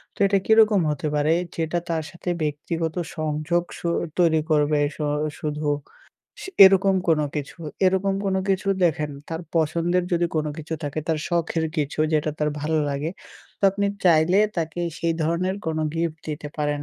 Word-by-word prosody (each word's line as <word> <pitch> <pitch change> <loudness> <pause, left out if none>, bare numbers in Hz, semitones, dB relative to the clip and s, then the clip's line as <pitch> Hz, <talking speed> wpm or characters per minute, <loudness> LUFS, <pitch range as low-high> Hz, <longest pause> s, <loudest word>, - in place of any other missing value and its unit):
তো - - -20
এটা 195 0 +3
কিরকম 220 -3 +5
হতে 150 0 -2
পারে? 150 +2 +3 0.2
যেটা 165 +1 -1
তার 160 -1 -1
সাথে 175 +1 -6
ব্যক্তিগত 160 +2 -2 0.2
সংযোগ 155 +2 0
স - - -11 0.4
তৈরি 165 -2 +4
করবে 150 -1 +3 0.2
স - - -17 0.4
শুধু 150 0 -3 1.0
এরকম 195 0 +5
কোনো 155 -2 +3
কিছু, 145 -2 -5 0.3
এরকম 190 +1 +2
কোনো 190 -1 +1
কিছু 195 0 0 0.2
দেখেন। 150 -3 +1 0.2
তার 165 0 -4 0.2
পছন্দের 170 +3 +1
যদি 175 0 +2
কোনো 155 -1 0
কিছু 160 +1 -4
থাকে, 145 +1 -3
তার 160 -1 +1
শখের 170 -1 0
কিছু 150 -1 -2
যেটা 155 0 +1
তার 150 0 +1
ভাল্লাগে। 150 0 -1 0.5
তো - - -40
আপনি 200 +1 -1 0.2
চাইলে 170 +2 +5 0.2
তাকে 165 0 -2 0.2
সেই 170 0 +1
ধরনের 175 +4 0
কোনো 160 -1 -1
gift 165 -1 -2
দিতে 150 -1 -4
পারেন। 145 -1 -1
160 Hz, 155 wpm, -24 LUFS, 150-175 Hz, 1.0 s, কিরকম